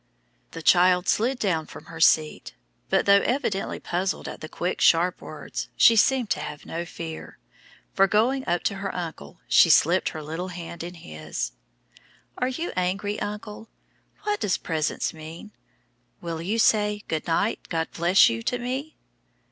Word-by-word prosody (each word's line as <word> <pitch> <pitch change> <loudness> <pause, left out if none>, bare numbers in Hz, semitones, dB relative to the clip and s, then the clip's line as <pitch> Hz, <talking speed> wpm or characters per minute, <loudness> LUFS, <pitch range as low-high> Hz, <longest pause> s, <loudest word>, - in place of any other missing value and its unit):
The 165 - -9
child 180 +1 +4
slid 245 +5 +1
down 170 -8 -1
from - - -12
her 165 - -10
seat, 155 -1 +2 0.3
but - - +2
though 200 0 +6
evidently 240 -7 -1
puzzled 185 +2 -2
at - - -8
the 155 - -7
quick, 180 +2 -3
sharp 175 +2 +3
words, - - -7
she 230 - +7
seemed 245 +1 +3
to - - +1
have 145 0 -7
no 170 +1 -4
fear, 165 -1 -8 0.6
for, 195 - +4
going 240 +7 +2
up 175 0 0
to 200 - -1
her 195 0 -3
uncle, 160 - -7
she - - +6
slipped - - +4
her 155 - -7
little 165 +5 -5
hand 170 -2 -8
into 175 +1 -7
his. 75 -6 -5 0.9
"Are 250 - +1
you 290 +7 -3
angry, 195 +3 -1
uncle? 210 +1 -6 0.5
What 420 0 -1
does 195 - 0
'presence' 160 -2 -2
mean? 160 +6 -10 0.7
Will 165 -2 -5
you 200 +7 -1
say, 210 -2 +2
'Good 160 +1 -3
night; 200 +6 +1
God 165 -1 -1
bless 175 +3 +5
you,' 115 0 -2
to 245 - -1
me?" 260 +5 -4
180 Hz, 165 wpm, -25 LUFS, 165-210 Hz, 0.9 s, she